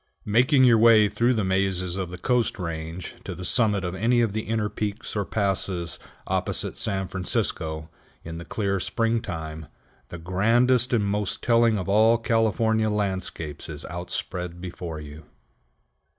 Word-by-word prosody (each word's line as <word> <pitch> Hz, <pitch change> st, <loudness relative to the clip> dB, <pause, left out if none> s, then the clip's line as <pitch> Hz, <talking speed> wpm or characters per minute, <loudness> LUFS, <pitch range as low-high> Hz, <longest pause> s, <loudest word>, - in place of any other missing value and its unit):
Making 130 Hz, +6 st, +4 dB
your 120 Hz, -3 st, +6 dB
way 110 Hz, -2 st, +7 dB
through 115 Hz, +5 st, +1 dB
the 110 Hz, -, 0 dB
mazes 95 Hz, -1 st, 0 dB
of 95 Hz, -2 st, -3 dB
the 90 Hz, -, -7 dB
Coast 125 Hz, +2 st, +1 dB
Range 85 Hz, -1 st, -5 dB
to 95 Hz, -, -6 dB
the 90 Hz, +1 st, -7 dB
summit 105 Hz, -4 st, +2 dB
of 90 Hz, -, -3 dB
any 115 Hz, +6 st, +2 dB
of 115 Hz, -4 st, +1 dB
the 110 Hz, -, -1 dB
inner 110 Hz, -1 st, 0 dB
peaks 105 Hz, +1 st, -4 dB
or 100 Hz, -1 st, 0 dB
passes 95 Hz, -4 st, -1 dB, 0.3 s
opposite -, -, -1 dB
San 95 Hz, -3 st, -1 dB
Francisco, 80 Hz, -4 st, -2 dB, 0.4 s
in 80 Hz, 0 st, -7 dB
the -, -, -7 dB
clear 100 Hz, -3 st, -1 dB
springtime, 80 Hz, -, -2 dB, 0.4 s
the 85 Hz, -, -7 dB
grandest 115 Hz, +8 st, +2 dB
and 110 Hz, -4 st, +2 dB
most 100 Hz, 0 st, -1 dB
telling 115 Hz, -2 st, +4 dB
of 95 Hz, -, -4 dB
all 110 Hz, +3 st, +5 dB
California 110 Hz, -1 st, +1 dB
landscapes 95 Hz, -8 st, -3 dB
is 75 Hz, -1 st, -7 dB
outspread 90 Hz, 0 st, -4 dB
before 85 Hz, -3 st, -6 dB
you. 75 Hz, +1 st, -10 dB
100 Hz, 150 wpm, -25 LUFS, 90-115 Hz, 0.4 s, way